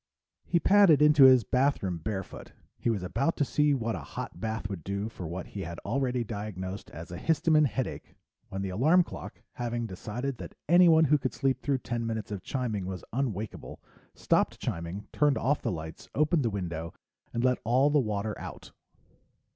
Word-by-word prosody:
He 170 - +2
padded 195 -5 +6
into 150 -2 +7
his 130 -2 +7
bathroom 125 -9 0
barefoot. 95 +3 -6 0.3
He - - 0
was 105 -5 -1
about 140 - 0
to 145 - +2
see 150 +1 +2
what 115 -3 -2
a - - -4
hot - - -7
bath 110 -1 -3
would 95 -6 -6
do 100 +4 -3
for 90 -6 -7
what 90 +3 -5
he 100 - -6
had 85 -2 -6
already 125 +1 0
diagnosed 100 -3 -6
as 85 +2 -9
a 90 - -6
histamine 155 - +3
headache 125 +2 -5 0.3
when 95 0 -4
the 95 - -2
alarm 155 - +4
clock, - - -10
having 120 -1 -3
decided 115 +6 -5
that - - -8
anyone 170 -1 +6
who 150 +1 +3
could 130 - -3
sleep 130 -1 0
through 140 -2 +1
ten 120 -2 -3
minutes 110 -2 -4
of 100 -3 -4
chiming 110 -6 -3
was 95 -2 -5
unwakable, 110 -5 -3 0.4
stopped - - +1
chiming, 85 +5 -4
turned 145 -2 +3
off 145 +2 +1
the - - -1
lights, 80 -2 -7
opened 150 +2 +3
the 120 - +1
window, 85 -5 -4 0.4
and 120 - -2
let 125 -1 +2
all 130 +5 +3
the 150 - +4
water 105 -3 -2
out. - - -9
115 Hz, 185 wpm, -29 LUFS, 100-140 Hz, 0.4 s, into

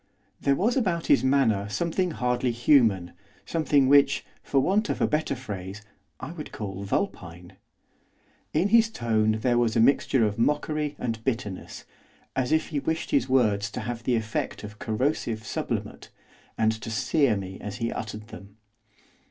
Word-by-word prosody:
There 140 - +3
was 220 - +1
about 185 -10 0
his 140 - +4
manner 115 -7 +2
something 170 - 0
hardly 125 -4 0
human; 115 - +3 0.3
something 145 -4 +2
which, 140 +1 +4 0.2
for 140 - +1
want 205 +9 +1
of - - -1
a - - +3
better 150 -2 0
phrase, 105 -5 -7 0.4
I 130 - -6
would 160 -3 -8
call 100 -2 -6
vulpine. 90 -2 -3 1.0
In 175 +6 +1
his 230 +1 +5
tone 110 - +1
there 120 0 +2
was 115 -2 +1
a - - +3
mixture 125 0 +3
of 105 +1 -2
mockery 150 +3 0
and 115 -2 -4
bitterness, 110 -7 -4 0.5
as 130 -1 0
if 155 0 +2
he 150 -3 -1
wished 160 +3 -2
his 130 - +2
words 105 -6 +2
to - - -5
have 120 -1 -4
the 120 +1 +1
effect 110 -1 -3
of 105 0 -9
corrosive 115 -1 -1
sublimate, - - -4 0.5
and 110 0 +3
to - - -6
sear 120 +1 +2
me 95 -1 -7
as 105 0 -5
he 115 -1 -2
uttered 105 0 -6
them. 100 0 -12
120 Hz, 160 wpm, -26 LUFS, 105-145 Hz, 1.0 s, his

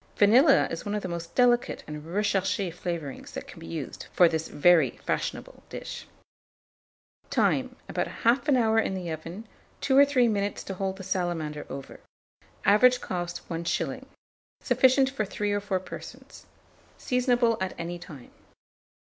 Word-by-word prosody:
Vanilla 260 +8 +6
is 165 - -4
one 205 0 -3
of 210 - -3
the - - -2
most 170 -1 -6
delicate 245 -1 +2
and 150 0 -7
recherché 195 +1 -1
flavourings 170 -6 -5
that - - -6
can - - -12
be - - -10
used 85 - -6
for 175 - +6
this 160 -1 -2
very 170 +3 +4
fashionable - - -3
dish. - - -7 1.2
Time. - - +1
About - - -2
1/2 255 +4 +2
hour 225 -2 +3
in 195 - 0
the 180 -3 -4
oven; 165 +7 -7 0.3
2 265 - +2
or 280 - +9
3 270 -4 +3
minutes 205 -2 -1
to 195 - -5
hold 190 0 -3
the 190 - -8
salamander 175 -5 -2
over. 135 0 -8 0.7
Average 250 +5 +5
cost, 175 -4 -5
1s. 170 0 -2 0.6
Sufficient 265 +1 +4
for 265 -5 -1
3 205 0 -2
or 205 - +1
4 195 -2 -1
persons. 185 - -11 0.5
Seasonable 245 -2 +2
at 190 - -2
any 175 +1 -5
time. 155 -8 -12
195 Hz, 150 wpm, -27 LUFS, 170-240 Hz, 1.2 s, or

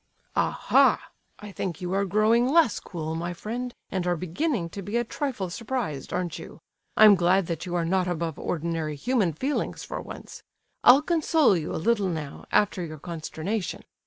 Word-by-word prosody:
"Aha! - - +3 0.3
I 210 -1 -9
think 185 -4 -4
you 180 0 -3
are 200 +1 +1
growing 215 +5 +3
less 325 -7 +4
cool, 160 -3 -5
my 170 +2 -3
friend, 240 +7 -4 0.2
and 185 -3 -1
are 175 - +2
beginning 185 - -1
to 200 - -6
be 205 +5 -2
a 240 - +2
trifle 225 -7 -3
surprised, 220 - -4
aren't 180 -2 -2
you? - - -11 0.4
I'm 215 -1 +9
glad 185 +1 +3
that 165 0 -4
you 175 - -3
are 170 -1 +1
not 185 +1 +1
above 170 -3 -3
ordinary 165 -2 -2
human 205 - +1
feelings, 265 - -2
for - - -5
once. - - -10 0.4
I'll 270 +4 +8
console 315 - +3
you 160 -3 -3
a - - -2
little 205 +2 +1
now, 155 -4 -5
after 205 -3 +2
your 155 -2 -6
consternation. 170 +5 -4
185 Hz, 175 wpm, -26 LUFS, 170-230 Hz, 0.4 s, I'm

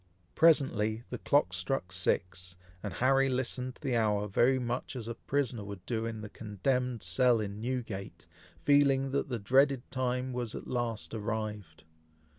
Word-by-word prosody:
Presently 120 -9 +3
the - - -4
clock 140 -11 +2
struck 90 +1 -2
six, 90 0 -1 0.3
and 105 - -4
Harry 135 +5 +3
listened 130 0 -2
to - - -20
the 130 -4 0
hour 105 -2 +1
very 125 +6 +3
much 125 +2 -3
as 115 -3 -5
a 115 - -3
prisoner 125 -3 -2
would 100 -2 -8
do 115 -1 -1
in 110 -1 -5
the 105 - -6
condemned 120 +3 -2
cell 115 +8 +3
in 105 0 -4
Newgate, 115 -6 -4 0.3
feeling 140 -2 +3
that 140 +1 -1
the 125 - -1
dreaded 130 +4 +3
time 130 0 -1
was 120 -3 -3
at - - -7
last 120 -4 -2
arrived. 105 -6 -4
120 Hz, 160 wpm, -31 LUFS, 105-130 Hz, 0.3 s, Presently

